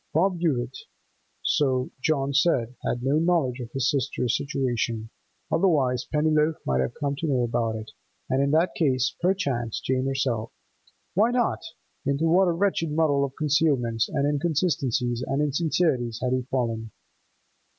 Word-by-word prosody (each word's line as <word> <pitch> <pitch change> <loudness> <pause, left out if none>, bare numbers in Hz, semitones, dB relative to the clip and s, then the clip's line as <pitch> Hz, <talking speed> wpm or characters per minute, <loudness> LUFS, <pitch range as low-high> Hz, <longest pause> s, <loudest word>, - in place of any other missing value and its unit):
Bob 180 +2 +2
Hewett—so 130 -1 -2
John 140 -2 0
said—had 125 -5 0
no 140 +4 +2
knowledge 160 -7 +1
of 120 -2 -6
his 135 -2 0
sister's 130 -3 0
situation, 120 -5 -2 0.4
otherwise 140 -9 +2
Pennyloaf 155 +1 +2
might 65 -1 +1
have 65 - -2
come 140 -1 -2
to 160 - -2
know 130 -4 +1
about 115 -1 -1
it, 110 0 -7 0.4
and 130 +1 +1
in 140 - +2
that 165 +3 +2
case, 135 -4 +1
perchance, 140 - 0
Jane 130 0 -1
herself. 125 -5 -1 0.6
Why 215 +5 +3
not? 245 -1 0 0.4
Into 140 +3 0
what 180 +3 +4
a - - +3
wretched 170 -2 0
muddle 150 -3 +2
of 135 -1 -3
concealments 140 -7 +1
and 140 -1 0
inconsistencies 140 -6 0
and 135 +1 -1
insincerities 145 -5 0
had 125 0 0
he 130 - +1
fallen! 115 -3 -1
140 Hz, 140 wpm, -25 LUFS, 125-160 Hz, 0.6 s, what